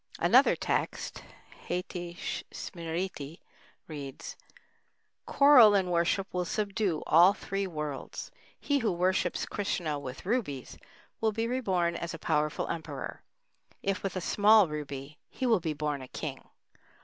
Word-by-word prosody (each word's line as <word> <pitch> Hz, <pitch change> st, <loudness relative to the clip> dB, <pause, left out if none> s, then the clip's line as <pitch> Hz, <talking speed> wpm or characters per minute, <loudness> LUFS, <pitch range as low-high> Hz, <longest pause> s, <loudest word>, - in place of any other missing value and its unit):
Another -, -, +5 dB
text -, -, -2 dB, 0.5 s
(Hâiti 175 Hz, -1 st, -4 dB, 0.3 s
Smriti) 165 Hz, -2 st, -5 dB, 0.5 s
reads: 140 Hz, -3 st, -7 dB, 0.9 s
Coral 260 Hz, -7 st, +7 dB
in 185 Hz, -2 st, +1 dB
worship 175 Hz, +3 st, +2 dB
will 180 Hz, 0 st, 0 dB
subdue 200 Hz, -2 st, -1 dB
all 175 Hz, +5 st, +6 dB
the -, -, -17 dB
three 195 Hz, 0 st, -2 dB
worlds. 150 Hz, -5 st, -5 dB, 0.3 s
He 285 Hz, -1 st, +1 dB
who 225 Hz, -5 st, +1 dB
worships 180 Hz, 0 st, 0 dB
Krishna 170 Hz, -7 st, -2 dB
with 130 Hz, +1 st, -8 dB
rubies 190 Hz, -, -2 dB, 0.4 s
will 220 Hz, -1 st, +2 dB
be 225 Hz, +2 st, -1 dB
reborn 190 Hz, -9 st, 0 dB
as 170 Hz, 0 st, -4 dB
a -, -, -6 dB
powerful 150 Hz, -1 st, 0 dB
emperor; 165 Hz, -1 st, -5 dB, 0.6 s
if 195 Hz, 0 st, -1 dB
with 195 Hz, -2 st, -3 dB
a 185 Hz, -, -2 dB
small 210 Hz, +2 st, +5 dB
ruby, 150 Hz, -1 st, -6 dB
he 260 Hz, -, -4 dB
will 230 Hz, -5 st, +4 dB
be 160 Hz, -2 st, -2 dB
born 150 Hz, -2 st, -2 dB
a 130 Hz, -, -8 dB
king. -, -, -6 dB
175 Hz, 135 wpm, -30 LUFS, 150-200 Hz, 0.9 s, Coral